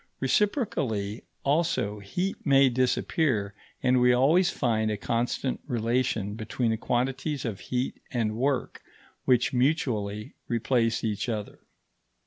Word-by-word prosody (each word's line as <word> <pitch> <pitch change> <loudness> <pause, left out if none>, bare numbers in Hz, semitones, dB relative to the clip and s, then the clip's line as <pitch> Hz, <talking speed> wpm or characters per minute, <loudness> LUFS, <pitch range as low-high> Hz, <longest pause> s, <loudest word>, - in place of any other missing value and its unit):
Reciprocally, 130 - 0 0.2
also, 140 -9 +1
heat 180 - -3
may 135 -2 +5
disappear, 125 -3 +1 0.3
and 125 -1 +4
we 125 0 +5
always 160 +9 +4
find 110 -8 0
a 105 - -1
constant 120 +4 -1
relation 115 -4 0
between 115 +2 -1
the 110 - 0
quantities 130 +5 -1
of 105 -5 -3
heat 125 +4 -3
and 110 -4 -1
work 135 +3 -1 0.4
which 125 -1 +3
mutually 115 -6 0
replace 115 -1 +1
each 110 +1 -1
other. 105 -3 -4
125 Hz, 115 wpm, -27 LUFS, 110-135 Hz, 0.4 s, may